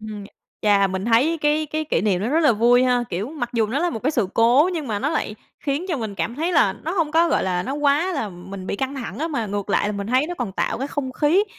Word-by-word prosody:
Ừm. 210 -2 -7 0.4
Chà, 200 -2 +4
mình 190 +1 -3
thấy 255 +9 +3
cái 300 +1 +1
cái 310 +1 -3
kỷ 305 - 0
niệm 195 -4 +1
nó 215 - -1
rất 315 +4 +2
là 300 -6 +5
vui 240 +3 +4
ha. 250 -1 +2
Kiểu, 190 +7 -3
mặc 245 -7 -4
dù 225 -3 +1
nó 255 +7 -2
là 350 +2 +1
một 225 - -4
cái 285 - +2
sự 230 -10 0
cố 245 +9 +4
nhưng 310 -5 -3
mà 210 -3 -2
nó 270 - -1
lại 300 -9 -2 0.3
khiến 290 +6 -2
mình 220 -3 -4
cảm 230 +4 -3
thấy 335 +4 -1
là 200 - +4
nó 320 - -5
hông 330 -5 0
có, 335 +1 +4
gọi - - +1
là, 180 -1 0
nó 270 +8 -3
quá 295 +5 +2
là 275 -9 -2
mình 185 +1 -9
bị - - -2
căng 265 +4 -3
thẳng 265 -1 -6
á, 325 +2 -1
mà 255 -8 -2
ngược 205 0 -4
lại 205 - +2
là 210 - -2
mình 200 0 -4
thấy 255 +5 +2
nó 355 - -4
còn 230 -6 -3
tạo - - -1
cái 270 - -2
không 270 -3 -3
khí 320 +9 +3
250 Hz, 290 wpm, -22 LUFS, 210-300 Hz, 0.4 s, là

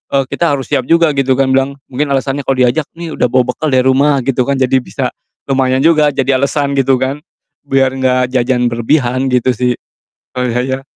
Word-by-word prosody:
eee, 135 - +3
kita 165 -5 +1
harus 135 -3 -7
siap 130 - 0
juga 165 -2 +3
gitu 135 -2 +1
kan, 135 -1 +1
bilang 135 +1 +1 0.2
mungkin 145 +4 -1
alasannya 135 +1 -1
kalo 130 -2 +2
diajak, 145 +4 0
"Nih 170 -2 -6
udah - - +3
bawa 125 0 +1
bekal 155 +5 -4
dari 130 -1 +2
rumah," 135 0 +2
gitu 135 -2 0
kan, 140 - +1
jadi 130 0 +2
bisa - - -4 0.3
lumayan 130 0 +1
juga, 155 -2 +4
jadi 135 -1 0
alasan 140 +1 0
gitu 135 -1 +2
kan, 135 +3 -2 0.5
biar 135 -1 +2
gak 125 -1 +1
jajan 125 -1 +1
berlebihan 125 +2 0
gitu 125 0 +1
sih. 125 +1 0 0.6
Kalo 125 -1 -1
saya. 130 +3 -2
130 Hz, 195 wpm, -14 LUFS, 125-140 Hz, 0.6 s, juga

